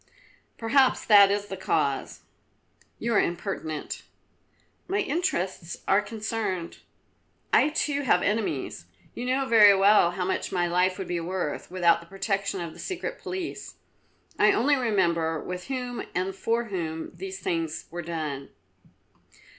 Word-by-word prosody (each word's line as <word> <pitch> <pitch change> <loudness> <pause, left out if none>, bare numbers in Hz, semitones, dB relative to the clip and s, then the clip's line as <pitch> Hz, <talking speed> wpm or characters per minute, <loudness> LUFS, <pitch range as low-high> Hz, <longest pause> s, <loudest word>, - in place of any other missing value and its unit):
"Perhaps 255 +3 +3
that 200 -2 +8
is 205 0 0
the 195 - -6
cause." 155 -7 -1 0.8
"You 235 +1 -1
are 205 - +5
impertinent." 170 -4 -4 0.9
"My 390 - 0
interests 295 - -1
are 195 +2 +4
concerned. 210 -5 -4 0.7
I 300 - +5
too 295 -2 -1
have 230 -9 +3
enemies. 210 +1 -2 0.3
You 245 - -5
know 265 +2 +1
very 210 -5 +7
well 200 -2 +6
how 180 0 -2
much 190 - -2
my 175 -2 +1
life 180 +2 +1
would 190 -3 -5
be 175 -1 -1
worth 175 -2 -3
without 175 -2 +3
the 170 - -15
protection 195 0 -2
of 165 -2 -5
the - - -14
Secret 390 +7 -4
Police. 370 -2 -6 0.6
I - - +6
only 285 +5 +3
remember 170 - +1
with 180 +2 -6
whom 250 -3 -3
and 185 +1 -1
for 230 +4 0
whom 160 -3 -3
these 190 +1 -6
things 165 -2 -2
were 175 +1 -4
done." 155 -5 -4
195 Hz, 140 wpm, -26 LUFS, 170-230 Hz, 0.9 s, that